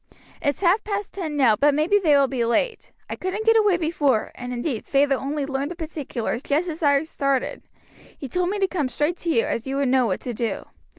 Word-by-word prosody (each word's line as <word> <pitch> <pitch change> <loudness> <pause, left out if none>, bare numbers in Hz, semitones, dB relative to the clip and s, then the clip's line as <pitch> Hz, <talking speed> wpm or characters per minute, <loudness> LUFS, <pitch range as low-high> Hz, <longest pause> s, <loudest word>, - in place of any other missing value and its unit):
It's 285 +4 -1
half 380 +3 +3
past 405 -1 -4
ten 320 -6 -4
now, 245 -6 +5
but 285 +4 +3
maybe 330 +8 +3
they 305 -7 +4
will 280 - +5
be 260 -3 -1
late. 335 - -1 0.2
I - - -4
couldn't 385 +4 -4
get 450 0 +5
away 420 -5 +4
before, 295 -8 0
and 245 0 -7
indeed 245 -1 -3
feyther 280 0 +2
only 280 +2 -2
learned 275 +1 -2
the 350 - -6
particulars 290 -8 -4
just 300 +5 0
as 325 0 -6
I 285 -1 +3
started. 275 -4 -1 0.6
He 275 - -6
told 360 +7 -1
me 410 - -1
to 390 -1 +2
come 310 -8 -2
straight 295 +7 -1
to 340 - -4
you, 230 -8 +2
as 230 +2 -3
you 270 - -2
would 275 -2 +1
know 255 -2 +3
what 185 - -2
to 245 - -4
do. 230 0 -3
290 Hz, 230 wpm, -23 LUFS, 265-350 Hz, 0.6 s, now